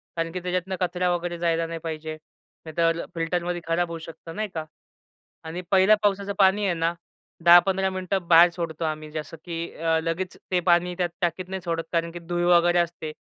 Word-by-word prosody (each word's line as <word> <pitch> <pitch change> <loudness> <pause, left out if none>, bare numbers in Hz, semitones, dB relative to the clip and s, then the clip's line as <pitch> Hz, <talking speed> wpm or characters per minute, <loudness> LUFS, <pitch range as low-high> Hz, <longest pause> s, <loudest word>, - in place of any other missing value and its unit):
कारण 165 0 -2
की 185 - -4
त्याच्यातनं 185 +1 -2
कचरा 180 0 0
वगैरे 175 0 -4
जायला 165 -1 +1
नाही 165 0 -5
पाहिजे. 155 -1 -4 0.5
नाहीतर 165 +1 +1
अ, - - -8
फिल्टरमध्ये 175 +1 -1
खराब 170 +1 +1
होऊ 165 - -5
शकत 165 0 -11
नाही 215 0 -2
का. 160 -1 -4 0.8
आणि 165 +3 -5
पहिल्या 195 +3 +6
पावसाचं 200 0 +1
पाणी 200 +2 +4
आहे 180 - +2
ना 165 +1 0 0.5
10-15 190 +2 +6
मिनिटं 185 -1 -3
बाहेर 170 +1 +8
सोडतो 165 -2 -4
आम्ही. 155 -1 -4
जसं 155 +1 -6
की 170 -1 -5
अ, 160 0 +1
लगेच 170 +2 -3
ते 180 - +3
पाणी 175 +1 +3
त्यात 175 -1 0
टाकीत 175 +2 -1
नाही 190 -1 -4
सोडत, 165 -1 -1
कारण 165 0 0
की 175 - -7
धुळ 175 +1 -2
वगैरे 175 0 +4
असते 170 -2 -2
170 Hz, 190 wpm, -25 LUFS, 165-180 Hz, 0.8 s, बाहेर